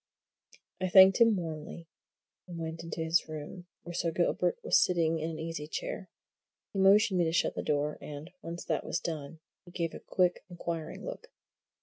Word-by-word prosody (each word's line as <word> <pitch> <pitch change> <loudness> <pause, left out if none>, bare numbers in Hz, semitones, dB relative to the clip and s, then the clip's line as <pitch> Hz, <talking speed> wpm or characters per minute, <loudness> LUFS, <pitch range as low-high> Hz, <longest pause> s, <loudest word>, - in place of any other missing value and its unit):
I 185 - 0
thanked 190 +4 +8
him 230 -2 +6
warmly, 165 -1 -6 0.6
and 175 -2 -7
went 165 0 -5
into 165 0 -4
his 160 +1 +2
room, 155 +4 -7 0.2
where 175 - -7
Sir 170 - 0
Gilbert 175 +1 +1
was - - +5
sitting 165 -2 +1
in 160 +1 -2
an 160 - -5
easy 160 -2 -5
chair. 185 +4 -5 0.6
He 195 - -2
motioned 195 0 +5
me 175 - +3
to 160 - 0
shut 170 - +1
the - - -3
door, 150 0 -1
and, 150 +3 -8
once 170 +1 -6
that - - -1
was - - -2
done, 155 -1 -5 0.2
he - - -15
gave 170 -2 -3
a - - -7
quick, 180 -1 +1
inquiring 170 -2 -5
look. - - -7
170 Hz, 185 wpm, -30 LUFS, 160-180 Hz, 0.6 s, thanked